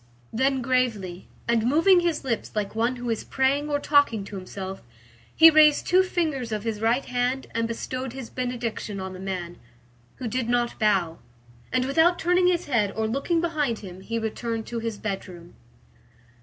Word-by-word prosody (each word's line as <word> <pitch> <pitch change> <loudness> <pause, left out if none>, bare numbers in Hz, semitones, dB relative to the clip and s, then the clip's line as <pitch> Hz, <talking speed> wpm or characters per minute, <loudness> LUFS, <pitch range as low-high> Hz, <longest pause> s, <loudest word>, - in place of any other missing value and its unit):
Then 265 +2 +1
gravely, 225 -8 -1 0.2
and 235 -1 +2
moving 330 +7 +5
his 340 -4 -1
lips 235 -5 -2
like 205 -2 -2
one 230 +3 0
who 245 -1 -3
is 225 - -2
praying 275 +3 0
or 290 -1 +1
talking 285 -8 +3
to 200 - -9
himself, 190 0 -7 0.5
he 325 0 +9
raised 305 -1 +5
two 365 +1 +5
fingers 310 -10 -2
of 210 -1 -2
his 220 -2 -3
right 235 +4 +2
hand 250 +2 -1
and 230 0 0
bestowed 255 +2 -4
his 265 -3 -7
benediction 240 -5 -4
on 190 0 -5
the 185 - -9
man, 180 -2 -5 0.6
who 250 - -5
did 235 +1 -2
not 240 0 0
bow, 190 -7 +1 0.5
and 255 0 +1
without 325 +6 +3
turning 360 +1 +3
his 355 -1 +1
head 225 -8 +1
or 220 - 0
looking 280 +8 0
behind 300 -8 -1
him, 185 0 -10
he 230 +4 -3
returned 225 0 -3
to 235 - -4
his 225 -2 -4
bedroom. 185 -5 -6
240 Hz, 175 wpm, -25 LUFS, 215-280 Hz, 0.6 s, he